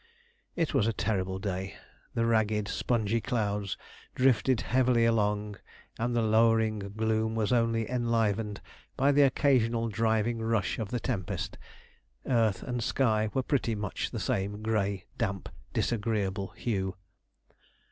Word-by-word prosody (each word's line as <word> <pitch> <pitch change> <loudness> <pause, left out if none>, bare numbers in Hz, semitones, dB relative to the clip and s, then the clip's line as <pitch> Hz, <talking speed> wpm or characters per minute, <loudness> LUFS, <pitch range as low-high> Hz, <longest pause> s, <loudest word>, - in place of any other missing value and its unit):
It 165 -3 0
was 110 - +3
a 115 - +1
terrible 95 -3 -1
day; 95 0 -4 0.4
the 115 - +2
ragged, 110 -2 +1
spongy 115 0 0
clouds 105 -6 -1 0.4
drifted 130 -1 +3
heavily 125 +1 +3
along, 105 -2 0 0.4
and 120 +1 0
the 115 - +2
lowering 110 0 +3
gloom 110 +2 -1
was 110 +1 +1
only 115 -2 +2
enlivened 115 -4 0 0.4
by 140 +2 +4
the 145 +1 +4
occasional 125 -5 +3
driving 110 +1 +1
rush 115 -3 0
of 110 -3 -3
the 125 - -2
tempest. 105 -7 -3 0.7
Earth 115 -6 +2
and 125 -2 -3
sky 110 -5 +1
were 130 - +1
pretty 125 -4 0
much 105 -2 -3
the - - -5
same 100 +2 -2
grey, 100 -3 0
damp, - - -2 0.2
disagreeable 100 -4 -1
hue. 95 -5 -2
110 Hz, 130 wpm, -29 LUFS, 105-115 Hz, 0.7 s, by